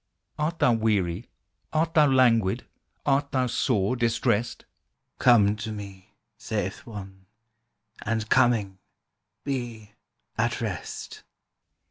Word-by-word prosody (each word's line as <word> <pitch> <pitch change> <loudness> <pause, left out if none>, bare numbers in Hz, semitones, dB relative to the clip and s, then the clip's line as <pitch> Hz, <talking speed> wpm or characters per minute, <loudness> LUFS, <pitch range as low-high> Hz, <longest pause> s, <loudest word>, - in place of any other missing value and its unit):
Art 160 +3 -1
thou 125 - +4
weary, 105 -3 0 0.4
art 160 +1 0
thou 155 -3 +6
languid, 120 -7 +3 0.4
Art 140 +1 +2
thou 130 -1 +1
sore 115 -2 +1
distressed? 115 -1 0 0.5
"Come 105 -5 +5
to 110 +1 -5
Me," 100 -3 -9 0.2
saith - - -4
One, 95 -3 -9 0.8
"and 110 -1 -1
coming, 110 -7 +2 0.6
Be 120 -6 -4 0.5
at - - +1
rest." - - -5
115 Hz, 100 wpm, -26 LUFS, 100-130 Hz, 0.8 s, thou